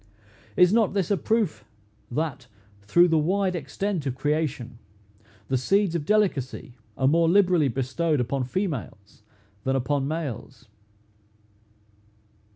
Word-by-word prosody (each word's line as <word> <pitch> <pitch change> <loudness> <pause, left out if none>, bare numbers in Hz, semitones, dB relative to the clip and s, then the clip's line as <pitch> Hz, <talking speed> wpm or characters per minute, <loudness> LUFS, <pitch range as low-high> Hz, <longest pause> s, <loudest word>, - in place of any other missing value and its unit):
Is 180 +2 +5
not 220 -3 +2
this 195 -1 0
a - - +4
proof, 215 0 -1 0.5
that, 150 +1 -3 0.3
through 170 - +4
the 165 -2 +2
wide 185 +4 0
extent 170 +2 -3
of 130 - -2
creation, 140 -5 -2 0.7
the 130 -1 0
seeds 195 +6 +2
of 160 -4 -3
delicacy 175 - 0 0.2
are 130 - +2
more 165 +3 +3
liberally 180 -5 +4
bestowed 135 +5 -1
upon 125 +2 -1
females 130 - -5 0.4
than 135 0 0
upon 135 +1 0
males? 140 -5 -5
155 Hz, 120 wpm, -25 LUFS, 130-185 Hz, 0.7 s, Is